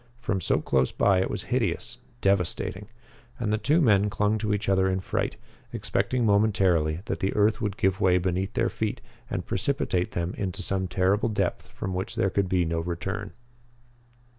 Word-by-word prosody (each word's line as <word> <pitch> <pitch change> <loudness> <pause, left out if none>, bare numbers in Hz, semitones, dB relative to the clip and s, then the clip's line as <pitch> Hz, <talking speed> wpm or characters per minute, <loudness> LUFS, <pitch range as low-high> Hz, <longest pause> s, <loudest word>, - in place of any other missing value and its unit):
From 100 -6 -1
so - - +2
close 65 -1 +1
by 95 -2 +3
it - - -1
was - - -4
hideous, - - -2 0.2
devastating; 95 0 0 0.5
and 105 -3 -1
the 110 - +1
two 150 +10 +3
men 105 - +4
clung 105 +2 +1
to 105 0 -1
each 105 0 -1
other 95 -1 +3
in 95 0 0
fright, 95 - -2 0.3
expecting 125 -2 0
momentarily 95 -7 +2
that - - -3
the 95 - -1
earth 105 +1 +3
would 105 -3 -2
give 95 0 +1
way 90 -1 +4
beneath 95 +2 -1
their - - +2
feet - - -3 0.3
and - - -3
precipitate 95 -4 -1
them 85 +1 -2
into 100 0 -3
some 95 0 -1
terrible 95 +5 +1
depth 105 - -1
from 95 - -5
which 95 +1 -3
there 95 - +1
could 100 -1 0
be 90 -2 +2
no 80 0 -1
return. 95 +4 -4
95 Hz, 180 wpm, -26 LUFS, 90-105 Hz, 0.5 s, men